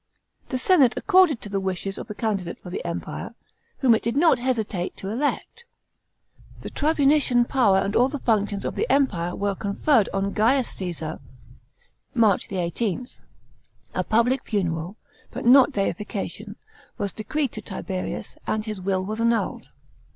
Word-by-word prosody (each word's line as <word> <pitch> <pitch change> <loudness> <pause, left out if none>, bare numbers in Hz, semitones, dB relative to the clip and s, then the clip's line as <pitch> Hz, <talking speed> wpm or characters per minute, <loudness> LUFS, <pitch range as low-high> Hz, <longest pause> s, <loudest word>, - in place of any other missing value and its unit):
The 260 - -1
senate 270 -3 +4
acceded 370 - +4
to 205 - -7
the 195 0 -1
wishes 190 +1 -3
of - - -7
the 210 - -7
candidate 200 -6 -2
for 180 - -11
the - - -4
Empire, 170 -1 -5 0.4
whom 255 -4 +4
it 220 - +2
did 235 +4 -2
not 325 -3 +4
hesitate 220 -8 -2
to 195 - -5
elect. 290 - -2 1.0
The - - -7
tribunician 285 -5 +3
power 220 -8 +3
and 195 +2 0
all 245 - +5
the 290 - -4
functions 210 -5 0
of - - -2
the 450 - -1
Empire 180 -11 +1
were 200 0 -1
conferred 205 +4 +1
on 195 0 -1
Gaius 235 +4 +2
Caesar* 170 -4 -5 1.0
(March 215 -5 +2
18); 190 +5 -2 0.9
a - - 0
public 235 +4 +2
funeral, 175 -2 -2 0.3
but - - -6
not 265 +3 +7
deification, 205 -1 -3 0.4
was 200 -3 -2
decreed 275 +6 -2
to 215 - -6
Tiberius; 190 -1 -5
and 215 0 -1
his 215 -3 -5
will 185 0 -1
was 215 +3 -3
annulled. 230 0 0
215 Hz, 150 wpm, -24 LUFS, 195-255 Hz, 1.0 s, not